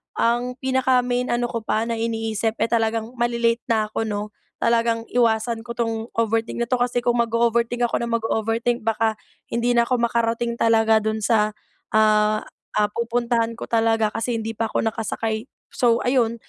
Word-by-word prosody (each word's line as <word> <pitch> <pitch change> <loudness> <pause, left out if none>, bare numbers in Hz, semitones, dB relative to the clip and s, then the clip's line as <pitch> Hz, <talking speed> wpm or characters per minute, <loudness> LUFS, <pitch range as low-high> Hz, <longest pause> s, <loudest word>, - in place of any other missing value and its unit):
ang 240 +2 0
pinaka 260 -1 +2
main 250 0 -1
ano 240 0 -1
ko 230 - -2
pa 220 0 -1
na 230 0 -3
iniisip, 225 -1 -1
eh, - - 0
talagang 225 0 0
malalate 235 -1 +1
na 215 -2 +1
ako, 225 - -2
'no? 210 0 -3 0.2
Talagang 230 0 +1
iwasan 230 -1 +1
ko 235 - -5
tong 225 -1 -2
overthink 225 +1 0
na - - -1
to, 250 - +2
kasi 245 0 0
kung 240 0 +1
mag-o-overthink 235 +1 +1
ako 240 - +1
na 235 - -2
mag-o-overthink 230 0 -1
baka 220 -1 +1 0.3
hindi 240 +1 +1
na 235 - +5
ko 250 +1 0
makarating 235 0 0
talaga 225 -1 +4
dun 220 0 -1
sa, 215 -1 +2 0.4
ah 215 0 +3 0.4
ah, 210 0 +3
pupuntahan 235 0 0
ko - - -6
talaga. 225 -1 +2
Kasi 235 +1 -1
hindi 225 0 -3
pa 225 +1 -1
ako - - -1
nakasakay, 220 0 -3 0.3
so, 235 -2 +3
ayun, 245 -3 +2
230 Hz, 170 wpm, -22 LUFS, 225-235 Hz, 0.4 s, na